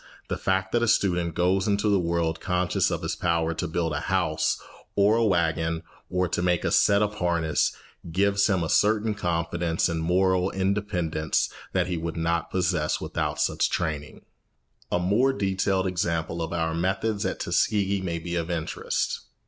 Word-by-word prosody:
The - - -1
fact 95 0 0
that 120 - +2
a 120 - +2
student 90 -6 +1
goes 95 +3 +2
into 100 +1 +1
the 100 -2 +3
world 85 -1 0
conscious 90 -2 +1
of - - -3
his - - -2
power 85 -2 0
to 90 +2 -3
build 80 -1 -1
a 75 - -1
house - - 0 0.4
or 100 +2 +4
a 115 - +2
wagon 80 -4 +1 0.3
or 90 0 +1
to 90 - -1
make 90 -1 +1
a - - +1
set 100 0 +4
of 105 0 -3
harness 85 -3 +1 0.4
gives 100 +3 +2
him 95 -4 +1
a - - -1
certain 105 +2 +3
confidence 85 -3 -1
and 80 -1 -2
moral 90 +2 +2
independence 95 -6 -1 0.2
that 90 -2 +2
he 90 -1 -2
would 80 0 -4
not 85 0 0
possess 90 -4 0
without - - -3
such - - +1
training. 75 -4 -3 0.7
A - - +2
more 105 +10 +2
detailed 95 -3 0
example 85 -2 -1
of 80 - -3
our 80 -1 -1
methods 95 +5 -1
at - - -2
Tuskegee 100 -2 +1
may 85 -3 -2
be 85 +1 -4
of 85 0 -2
interest. 85 -3 -2
90 Hz, 175 wpm, -26 LUFS, 85-95 Hz, 0.7 s, or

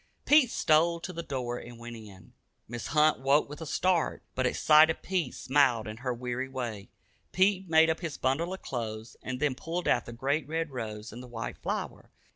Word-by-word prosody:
Pete 295 -5 +6
stole 170 -2 +3
to 180 - -6
the 170 - -4
door 125 -6 -4
and 120 0 -11
went 120 0 -8
in. 100 -5 -13 0.3
Mrs. 120 0 -6
Hunt 150 -1 +3
woke 135 +3 +3
with 145 +3 -9
a 160 - -5
start, 180 +1 +1
but 130 0 +1
at - - -2
sight 155 +1 +6
of 160 - -3
Pete 180 -8 -1
smiled 130 -5 +2
in 110 0 -6
her 125 +1 -3
weary 125 +2 -3
way. 120 -6 -5 0.4
Pete 190 -1 +2
made 160 0 +6
up 160 - -3
his 165 -5 -5
bundle 145 +7 0
of 190 - -7
clothes, 110 -2 -5
and 130 0 -5
then 145 -1 +1
pulled 170 +6 -4
out - - +2
the - - -6
great 140 +5 -1
red 160 0 -2
rose 110 -3 -6
and 120 - -8
the 125 - -10
white 115 -2 -6
flower. - - -4
135 Hz, 210 wpm, -29 LUFS, 120-160 Hz, 0.4 s, Pete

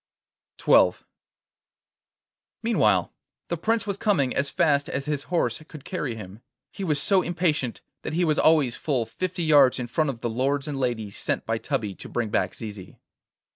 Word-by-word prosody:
XII - - +5 1.7
Meanwhile 105 - +2 0.4
the 170 - -1
Prince 225 +7 0
was 200 -2 -3
coming 165 - +1
as 140 +1 0
fast 145 0 +2
as 140 +1 -3
his 150 -2 -2
horse 155 -8 0
could 150 -4 -12
carry 150 -10 -3
him. 105 0 -10 0.3
He 195 - -6
was 150 -5 +1
so 190 +5 +4
impatient 165 -8 -1 0.2
that - - -5
he 175 +2 +2
was 155 -1 +1
always 150 -7 +4
full 130 -7 -1
fifty 185 +6 -3
yards 145 -5 +5
in 125 - -3
front 145 +6 0
of 120 -4 -5
the 120 - -1
lords 135 +4 0
and 145 -2 -3
ladies 110 -6 -2
sent - - -1
by - - -1
Tubby 105 -3 -2
to - - -10
bring 120 -3 -2
back - - 0
Zizi. 105 -4 -9
140 Hz, 175 wpm, -25 LUFS, 120-165 Hz, 1.7 s, XII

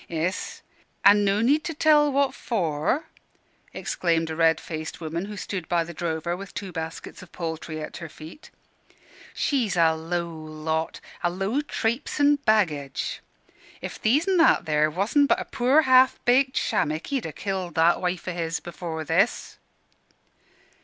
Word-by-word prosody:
"Iss, 170 +3 -3 0.4
an' 205 +1 +7
no 200 +1 +2
need 285 +7 +3
to 325 -3 -4
tell 295 -1 +4
what 275 0 +2
for," 180 - -1 0.7
exclaimed 165 -2 -1
a - - -4
red 165 -1 +3
faced 160 -1 -6
woman 165 +2 -4
who 210 0 -8
stood 185 -4 -5
by 170 -1 +2
the 170 +1 -9
drover, 170 +1 -2
with 195 +2 -10
two 195 -2 -5
baskets 165 -1 -7
of 185 - -14
poultry 160 -2 -5
at 155 - -7
her 170 -2 -8
feet. 155 - -12 0.9
"She's 240 -10 0
a 165 -1 +5
low 170 +2 -3
lot; 160 0 -4 0.2
a 175 - +1
low 195 +10 -1
trapesin' 285 +2 +1
baggage. 155 -11 0 0.6
If - - -7
These 280 - +2
an' 380 -1 +3
That, 330 - +4
there, 155 -1 +2
wasn' 205 - +2
but - - +2
a - - -4
poor, 270 +4 +3
ha'f 260 -1 +5
baked 260 +2 +3
shammick, 155 +1 0
he'd 265 -4 -1
ha' 160 - -6
killed 190 -3 -4
that 165 +1 +3
wife 180 0 -2
o' 180 - -2
his 165 -1 -2
afore 170 -2 -5
this." 165 +9 0
175 Hz, 160 wpm, -25 LUFS, 160-240 Hz, 0.9 s, an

